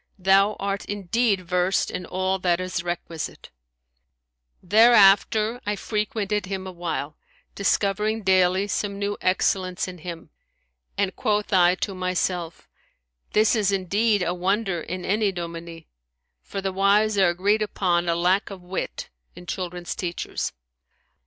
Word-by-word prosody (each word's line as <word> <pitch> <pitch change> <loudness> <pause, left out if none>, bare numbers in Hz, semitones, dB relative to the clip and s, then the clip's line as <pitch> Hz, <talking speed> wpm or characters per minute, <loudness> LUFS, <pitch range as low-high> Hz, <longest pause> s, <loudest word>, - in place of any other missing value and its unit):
Thou 195 +2 +4
art 200 0 -2
indeed 205 +1 0
versed 180 +1 0
in 180 - -5
all 190 +1 -1
that 175 -1 +1
is 185 -1 -3
requisite,' 170 -2 -6 1.1
thereafter 215 +2 +5
I 210 0 -1
frequented 210 -1 -2
him 190 -1 -4
a 190 - -6
while, 170 -4 -4 0.4
discovering 210 +2 0
daily 185 +1 +3
some 200 -1 -2
new 205 0 -2
excellence 185 0 0
in 180 -1 -8
him, 165 -1 -8 0.7
and 195 -2 0
quoth 210 -3 -1
I 180 -1 +5
to 195 - -3
myself, 180 -2 -2 0.7
This 215 +2 +4
is 205 -3 +2
indeed 200 +2 +1
a 175 - 0
wonder 190 0 -1
in 180 +2 -5
any 210 +1 +1
dominie; 170 -2 -7 0.5
for 195 - -6
the 190 -1 -2
wise 205 +3 +3
are 190 -2 +5
agreed 200 +5 +1
upon 175 -4 0
a 170 - +2
lack 180 +4 +1
of 190 -3 -10
wit 180 +2 -5 0.3
in 175 - -11
children's 175 -1 -4
teachers.' 175 -2 -4
190 Hz, 135 wpm, -24 LUFS, 180-205 Hz, 1.1 s, thereafter